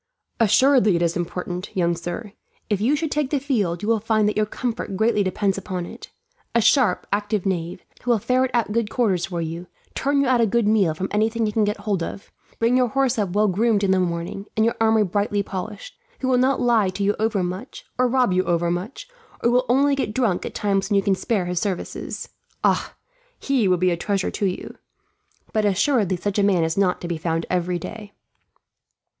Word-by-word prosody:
"Assuredly 230 Hz, -1 st, +4 dB
it 170 Hz, -, +1 dB
is 170 Hz, 0 st, 0 dB
important, 180 Hz, +2 st, -4 dB
young 170 Hz, -1 st, +2 dB
sir. 175 Hz, +5 st, -6 dB, 0.4 s
If 205 Hz, -1 st, +1 dB
you 260 Hz, +7 st, +3 dB
should 310 Hz, 0 st, -2 dB
take 295 Hz, -3 st, 0 dB
the 285 Hz, -, 0 dB
field, 210 Hz, -11 st, -1 dB
you -, -, -2 dB
will 225 Hz, -1 st, +3 dB
find 215 Hz, 0 st, +1 dB
that 210 Hz, -, 0 dB
your 215 Hz, 0 st, +1 dB
comfort 225 Hz, -4 st, -4 dB
greatly 220 Hz, 0 st, +2 dB
depends 195 Hz, 0 st, 0 dB
upon 185 Hz, -2 st, -4 dB
it. -, -, -10 dB, 0.5 s
A -, -, +5 dB
sharp, 230 Hz, -4 st, +3 dB
active 205 Hz, -1 st, -1 dB
knave, 180 Hz, -2 st, -3 dB, 0.2 s
who 245 Hz, -, -5 dB
will 235 Hz, -, +4 dB
ferret 255 Hz, +4 st, +1 dB
out 235 Hz, -4 st, 0 dB
good 225 Hz, -1 st, 0 dB
quarters 195 Hz, -9 st, 0 dB
for 175 Hz, -3 st, -3 dB
you, 165 Hz, +2 st, -5 dB, 0.3 s
turn 280 Hz, +1 st, +1 dB
you 280 Hz, -, +3 dB
out 250 Hz, -2 st, +3 dB
a 230 Hz, -, +3 dB
good 230 Hz, +1 st, +1 dB
meal 200 Hz, -7 st, +3 dB
from 190 Hz, +4 st, -3 dB
anything 220 Hz, +2 st, +1 dB
he 210 Hz, -, -1 dB
can 215 Hz, 0 st, +2 dB
get 205 Hz, 0 st, -2 dB
hold 205 Hz, -4 st, -1 dB
of, 195 Hz, -, -6 dB, 0.3 s
bring 230 Hz, +2 st, +2 dB
your 250 Hz, -1 st, +3 dB
horse 265 Hz, -1 st, +1 dB
up 195 Hz, -4 st, -1 dB
well 210 Hz, +1 st, +3 dB
groomed 210 Hz, +2 st, +2 dB
in 195 Hz, -, +2 dB
the 190 Hz, -, +3 dB
morning, 175 Hz, +3 st, -3 dB
and 220 Hz, -, +4 dB
your 230 Hz, -, +2 dB
armour 220 Hz, -1 st, +4 dB
brightly 205 Hz, +2 st, 0 dB
polished; 200 Hz, -, -7 dB, 0.3 s
who 260 Hz, -, -1 dB
will 255 Hz, -1 st, +3 dB
not 260 Hz, +1 st, +2 dB
lie 230 Hz, -5 st, +3 dB
to 195 Hz, +2 st, -3 dB
you 205 Hz, +1 st, +2 dB
overmuch, 200 Hz, 0 st, -2 dB
or 255 Hz, -, +4 dB
rob 250 Hz, -5 st, +2 dB
you 185 Hz, 0 st, +2 dB
overmuch, 175 Hz, -, -2 dB, 0.4 s
and 235 Hz, -, +4 dB
who -, -, +2 dB
will 250 Hz, +1 st, +3 dB
only 280 Hz, +3 st, +4 dB
get 240 Hz, -6 st, -2 dB
drunk 225 Hz, -9 st, +1 dB
at -, -, -9 dB
times 195 Hz, -1 st, 0 dB
when 205 Hz, -, +1 dB
you 195 Hz, -, +3 dB
can 195 Hz, -, +2 dB
spare 190 Hz, 0 st, -1 dB
his 180 Hz, -1 st, -1 dB
services. 190 Hz, -3 st, -4 dB, 0.4 s
Ah! -, -, +1 dB, 0.4 s
He 265 Hz, -7 st, +1 dB
would 180 Hz, -1 st, +2 dB
be 185 Hz, 0 st, +3 dB
a 170 Hz, -, -1 dB
treasure 195 Hz, +2 st, -1 dB
to 200 Hz, -, -1 dB
you. 185 Hz, -, -5 dB, 0.8 s
But 215 Hz, -, +1 dB
assuredly 205 Hz, -1 st, +2 dB
such 200 Hz, +3 st, -2 dB
a -, -, +3 dB
man 190 Hz, -4 st, +3 dB
is 160 Hz, 0 st, -1 dB
not 195 Hz, -2 st, +1 dB
to 175 Hz, -, -4 dB
be 170 Hz, -2 st, -3 dB
found 165 Hz, 0 st, -1 dB
every 180 Hz, 0 st, 0 dB
day." 205 Hz, +4 st, -8 dB
205 Hz, 220 wpm, -23 LUFS, 185-235 Hz, 0.8 s, A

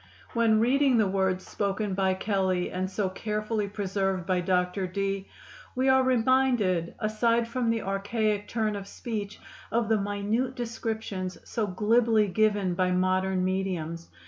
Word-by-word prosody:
When 230 Hz, -3 st, +3 dB
reading 260 Hz, +2 st, +3 dB
the 220 Hz, -, +4 dB
words 190 Hz, -1 st, 0 dB
spoken 200 Hz, 0 st, -2 dB
by 190 Hz, 0 st, +1 dB
Kelley 190 Hz, -3 st, 0 dB
and 185 Hz, +1 st, -2 dB
so 195 Hz, 0 st, -1 dB
carefully 215 Hz, +2 st, -2 dB
preserved 195 Hz, -2 st, -2 dB
by 185 Hz, -1 st, +1 dB
Dr. 180 Hz, +1 st, 0 dB
Dee, 195 Hz, +1 st, -2 dB, 0.5 s
we 260 Hz, +1 st, +2 dB
are 265 Hz, 0 st, +5 dB
reminded, 245 Hz, -8 st, +2 dB
aside 230 Hz, +2 st, +1 dB
from 235 Hz, 0 st, -1 dB
the 230 Hz, -1 st, 0 dB
archaic 205 Hz, +2 st, -1 dB
turn 220 Hz, -2 st, -1 dB
of 200 Hz, -1 st, -6 dB
speech, 210 Hz, -2 st, -5 dB, 0.3 s
of 230 Hz, -1 st, +1 dB
the 220 Hz, -1 st, +3 dB
minute 205 Hz, +6 st, -1 dB
descriptions 220 Hz, -6 st, -4 dB
so 220 Hz, -3 st, -1 dB
glibly 215 Hz, +3 st, +3 dB
given 205 Hz, -1 st, +1 dB
by 185 Hz, +1 st, +1 dB
modern 185 Hz, 0 st, +1 dB
mediums. 180 Hz, -3 st, -2 dB
205 Hz, 145 wpm, -27 LUFS, 185-225 Hz, 0.5 s, are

